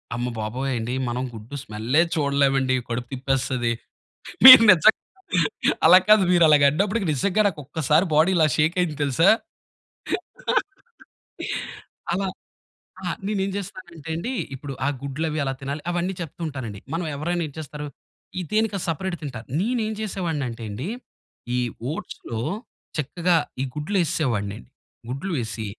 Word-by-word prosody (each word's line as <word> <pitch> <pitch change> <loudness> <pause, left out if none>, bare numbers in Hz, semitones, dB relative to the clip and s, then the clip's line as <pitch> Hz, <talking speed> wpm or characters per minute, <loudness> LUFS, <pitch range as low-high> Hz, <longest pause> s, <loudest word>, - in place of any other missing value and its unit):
అమ్మ 120 +1 -2
బాబోయండి 120 +2 -2
మనం 120 +1 -2
గుడ్డు 115 +5 -9
స్మెల్లే 115 +8 +1
చూడలేమండి. 140 -3 +2
కడుపు 120 +1 -3
తిప్పేస్తది. 130 -2 -1 0.7
మీరు 255 -3 +13
నిజంగా 190 +5 +5 0.9
అలా 175 +3 +9
కాదు, 215 -2 +7
మీరు 175 -1 +5
అలాగా 150 -2 +6
అన్నప్పటికి 200 +6 0
నిజంగా 200 +9 +1
నాక్కొక్కసారి 155 0 0
బాడీ 160 +5 +5
ఇలా 160 - +5
షేకయింది 165 +1 +1
తెలుసా? 145 +6 +4 2.8
అలా 195 +2 -1 0.8
ఆ! 180 - -3 0.2
నేనేం 200 -2 -1
జేస్తానంటే 180 -5 -8
అండి. 230 +10 -3 0.2
ఇప్పుడు 140 +1 -7
ఆ - - +2
గుడ్లు 140 +3 -3
అవి 155 - -3
ఎలా 135 - -1
తినాలి, 140 +2 -5
అవన్నీ 175 +2 -1
చెప్తూ 165 -1 -7
ఉంటానండి. 125 -9 -6
మనం 170 +2 -2
ఎవరైనా 170 +4 -1
ఏం 145 - -10
చేస్తారు, 150 -1 -6 0.5
ఇ - - -2
దేన్నికది 215 -3 0
సెపరేట్ 175 +3 -2
తింటారు. 125 -6 -7
నేనేం 220 +1 -1
జేసేవాడినటెండి. 145 - -4 0.7
ఈ - - +1 0.3
ఓట్స్‌లో 115 -7 -6 0.6
చక్కగా 170 +5 +1 0.3
ఈ - - 0
గుడ్లు 150 +7 -3
ఏసేసేవాడ్నండి. 120 - -2 0.4
గుడ్లు 140 +9 -4
వేసి, 110 -2 -4
150 Hz, 125 wpm, -23 LUFS, 130-180 Hz, 2.8 s, మీరు